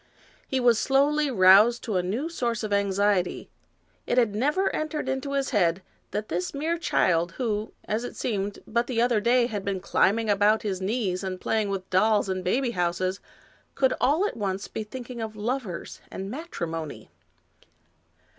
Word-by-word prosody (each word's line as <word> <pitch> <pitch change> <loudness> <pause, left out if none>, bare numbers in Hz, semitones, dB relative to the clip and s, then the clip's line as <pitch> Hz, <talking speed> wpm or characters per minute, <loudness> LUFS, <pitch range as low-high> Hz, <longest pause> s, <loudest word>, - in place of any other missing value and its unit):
He 265 - 0
was 240 -3 +4
slowly 290 +2 +2
roused 210 +2 +6
to 215 - -3
a 180 - +3
new 215 - -2
source 235 -9 -2
of 210 -1 -2
anxiety. 200 -2 +1 0.6
It 240 - 0
had 230 -5 +3
never 295 - +1
entered 310 -2 -3
into 265 +1 -2
his 275 0 0
head 185 -4 +2 0.3
that 210 +1 -3
this 180 - -3
mere 325 +4 -1
child, 170 - +1
who, 215 -3 -2
as 220 +3 -1
it 245 - -6
seemed, 205 -3 -2
but 235 +1 0
the 245 -3 -1
other 240 -2 +3
day 240 +2 +4
had 210 -5 -4
been 195 -1 -2
climbing 220 +4 +2
about 210 +1 +3
his 190 -3 -2
knees 195 -2 -1
and 185 -1 -4
playing 215 0 0
with 190 -1 -3
dolls 205 +2 +3
and 185 -1 -2
baby 245 +7 +1
houses, 185 0 -1 0.6
could 265 -1 +3
all 305 +9 +3
at - - -3
once 195 -3 -3
be 220 - -5
thinking 245 +2 -8
of 220 -1 -5
lovers 215 -4 -4
and 195 +1 -6
matrimony. 170 - -6
215 Hz, 170 wpm, -26 LUFS, 190-255 Hz, 0.6 s, roused